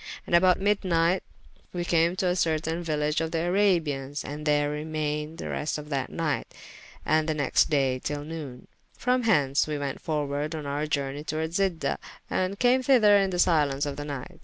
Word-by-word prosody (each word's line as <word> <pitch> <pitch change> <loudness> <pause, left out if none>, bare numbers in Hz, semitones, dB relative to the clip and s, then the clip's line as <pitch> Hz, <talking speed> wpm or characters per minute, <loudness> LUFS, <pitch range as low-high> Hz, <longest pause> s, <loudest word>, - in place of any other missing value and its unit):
And - - -6
about 180 +1 +5
myd 205 +1 +2
nyght 175 0 +1 0.5
we 175 -1 -2
came 170 +1 +2
to 185 -1 0
a 180 - +1
certayne 160 -1 0
village 150 -1 0
of 165 - -1
the 165 0 -1
Arabians, 160 -8 +1
and 150 +1 -6
there 145 0 +2
remayned 150 0 -3
the - - -6
rest 150 - -2
of 150 0 -9
that 135 -3 -2
nyght, 160 -3 -2 0.6
and 155 +1 +2
the 155 - 0
next 145 -3 +2
day 135 -3 +1
tyll 145 +2 -4
noone. 150 -5 -7 0.3
From 250 +1 +1
hence 145 -11 +3
we 150 -1 -2
went 140 -2 -4
forwarde 150 0 -2
on 155 -2 -5
our 145 +2 -2
journey 140 -1 -2
toward 155 +1 -3
Zida, 185 -3 0 0.3
and 185 +2 -1
came 250 +3 +3
thyther 240 -6 +5
in 195 - 0
the 180 - -3
silence 150 -5 +2
of 145 -1 -4
the 145 - -5
nyght. 140 -3 -7
155 Hz, 190 wpm, -27 LUFS, 145-175 Hz, 0.6 s, about